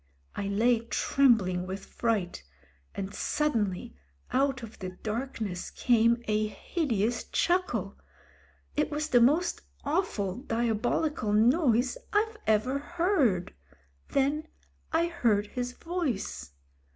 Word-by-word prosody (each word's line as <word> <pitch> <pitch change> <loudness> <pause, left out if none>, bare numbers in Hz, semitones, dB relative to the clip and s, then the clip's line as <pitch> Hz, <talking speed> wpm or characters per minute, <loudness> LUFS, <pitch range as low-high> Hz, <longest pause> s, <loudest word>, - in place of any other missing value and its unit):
I 200 - -2
lay 225 +4 +3
trembling 225 -6 +2
with 190 +1 -5
fright, 205 - -1 0.5
and 195 0 -4
suddenly 220 -13 -1 0.4
out 265 -2 +1
of 225 -1 -10
the 185 - -4
dark 225 +8 -4
ness 185 -5 -3
came 235 0 +3
a 215 0 +1
hideous 235 - -1
chuckle. 245 - 0 0.8
It 300 0 +1
was 305 0 -2
the 245 -3 +5
most 305 +9 +3 0.2
awful, 255 - -1
diabolical 235 0 0
noise 245 +2 +3
I've 435 +1 +1
ever 220 +6 +2
heard. 295 - +1 0.6
Then 290 +3 +1 0.4
I 325 +1 +3
heard 235 -12 +1
his 245 +3 -4
voice. 320 - -3
235 Hz, 110 wpm, -29 LUFS, 210-295 Hz, 0.8 s, the